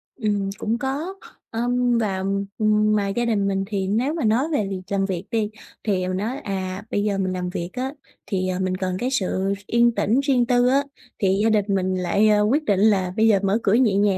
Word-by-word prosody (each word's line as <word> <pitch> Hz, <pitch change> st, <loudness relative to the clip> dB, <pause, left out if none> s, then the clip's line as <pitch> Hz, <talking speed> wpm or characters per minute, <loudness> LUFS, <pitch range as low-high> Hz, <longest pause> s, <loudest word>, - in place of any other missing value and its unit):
Ừm, 205 Hz, -5 st, -1 dB
cũng 225 Hz, +2 st, -1 dB
có. 280 Hz, +8 st, -3 dB, 0.4 s
Ờm, 245 Hz, +1 st, +1 dB
và, 210 Hz, -4 st, 0 dB, 0.4 s
ừm, 215 Hz, 0 st, +3 dB
mà 205 Hz, -1 st, +1 dB
gia 235 Hz, +5 st, -1 dB
đình 210 Hz, -4 st, +1 dB
mình 195 Hz, 0 st, 0 dB
thì 195 Hz, -2 st, -2 dB
nếu 235 Hz, +9 st, 0 dB
mà 325 Hz, -, -2 dB
nói 225 Hz, +6 st, +3 dB
về 215 Hz, -8 st, +1 dB
việc 190 Hz, -1 st, -4 dB
làm 195 Hz, -1 st, +1 dB
việc 185 Hz, -2 st, -3 dB
đi 220 Hz, -3 st, 0 dB, 0.3 s
thì 185 Hz, -4 st, 0 dB
mình 185 Hz, 0 st, -2 dB
nói, 225 Hz, +7 st, -2 dB
à, 190 Hz, 0 st, -4 dB
bây 205 Hz, -, 0 dB
giờ 205 Hz, -2 st, 0 dB
mình 185 Hz, -1 st, -1 dB
làm 180 Hz, -1 st, -3 dB
việc 170 Hz, -1 st, -4 dB
á 260 Hz, +1 st, -3 dB, 0.4 s
thì, 185 Hz, -2 st, -1 dB
ờ, 185 Hz, 0 st, -2 dB
mình 185 Hz, -1 st, -1 dB
cần 185 Hz, -1 st, -2 dB
cái 250 Hz, -, -1 dB
sự 195 Hz, -4 st, 0 dB
yên 235 Hz, 0 st, +3 dB
tĩnh 230 Hz, +6 st, +2 dB
riêng 270 Hz, -3 st, +2 dB
tư 245 Hz, 0 st, +3 dB
á 275 Hz, +2 st, +3 dB, 0.4 s
thì 195 Hz, 0 st, +2 dB
gia 225 Hz, -, +4 dB
đình 210 Hz, -2 st, +2 dB
mình 190 Hz, -2 st, 0 dB
lại, 185 Hz, +4 st, +2 dB
ơ, 210 Hz, -1 st, +4 dB
quyết 260 Hz, +9 st, +2 dB
định 200 Hz, -3 st, +2 dB
là 195 Hz, -4 st, +3 dB
bây 220 Hz, +1 st, +4 dB
giờ 210 Hz, -3 st, +4 dB
mở 195 Hz, +2 st, +2 dB
cửa 200 Hz, -, +3 dB
nhẹ 225 Hz, -4 st, +3 dB
nhàng. 200 Hz, -1 st, +2 dB
210 Hz, 235 wpm, -23 LUFS, 190-235 Hz, 0.4 s, gia